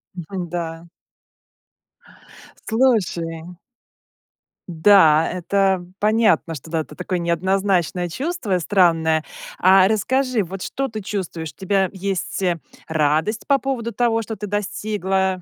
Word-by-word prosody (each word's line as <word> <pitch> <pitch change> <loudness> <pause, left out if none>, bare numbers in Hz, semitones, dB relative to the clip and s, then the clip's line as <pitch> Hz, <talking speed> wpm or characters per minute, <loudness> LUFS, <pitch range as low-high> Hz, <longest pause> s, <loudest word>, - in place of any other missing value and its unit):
Мгм, 175 0 -6
да. 170 -1 -5 1.8
Слушай 180 -8 0 1.1
Да, 165 -2 +5
это 190 0 0
понятно, 215 -5 +2
что, 155 +2 -9
да, 160 -1 0
это - - -10
такое 180 0 -3
неоднозначное 180 0 0
чувство, 260 - -2
странное. 165 -4 +2 0.3
А 190 +1 +6
расскажи, 250 +2 +1
вот, 185 +2 -7
что 270 0 -3
ты 220 -1 -6
чувствуешь? 180 -6 -5
У - - -35
тебя 190 -1 +1
есть, 195 0 -3
э, 175 -2 +1 0.3
радость 160 +7 0
по 280 -1 +4
поводу 240 -5 -3
того, 230 0 +1
что 220 0 -6
ты 210 - -6
достигла, 195 -2 -1
190 Hz, 115 wpm, -21 LUFS, 170-210 Hz, 1.8 s, А